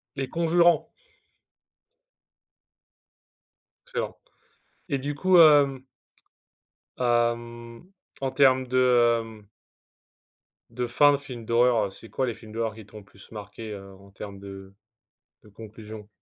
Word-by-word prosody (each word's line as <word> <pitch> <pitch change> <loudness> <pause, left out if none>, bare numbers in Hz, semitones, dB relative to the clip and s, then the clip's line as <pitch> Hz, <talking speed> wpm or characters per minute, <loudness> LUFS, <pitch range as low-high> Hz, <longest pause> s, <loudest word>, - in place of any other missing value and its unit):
Les 135 -1 -3
conjurants. 170 +2 +2 3.0
Excellent - - -4 0.7
et 140 -2 0
du 145 +2 -4
coup, 185 +3 +3
hem 145 -5 +6 1.1
hem, 120 +5 -2 0.3
en 135 -1 -2
termes 130 -2 +4
de, 130 - 0 0.4
hem 110 -2 -9 1.2
de 125 -1 -3
fin 145 +4 +5
de - - +1
film 125 -5 -9
d'horreur, 115 -1 +3
heu, - - -4
c'est 110 +3 -13
quoi 130 - -1
les 120 - -2
films 110 -1 -14
d'horreur 115 -1 -3
qui 110 -3 -12
t'ont 105 0 -13
plus 100 +1 -15
marqué, 105 +1 -8
heu, 100 -1 -9
en 100 0 -18
termes 100 0 -9
de 95 -1 -11 0.7
de - - -18
conclusion? 110 0 -11
120 Hz, 120 wpm, -26 LUFS, 105-135 Hz, 3.0 s, hem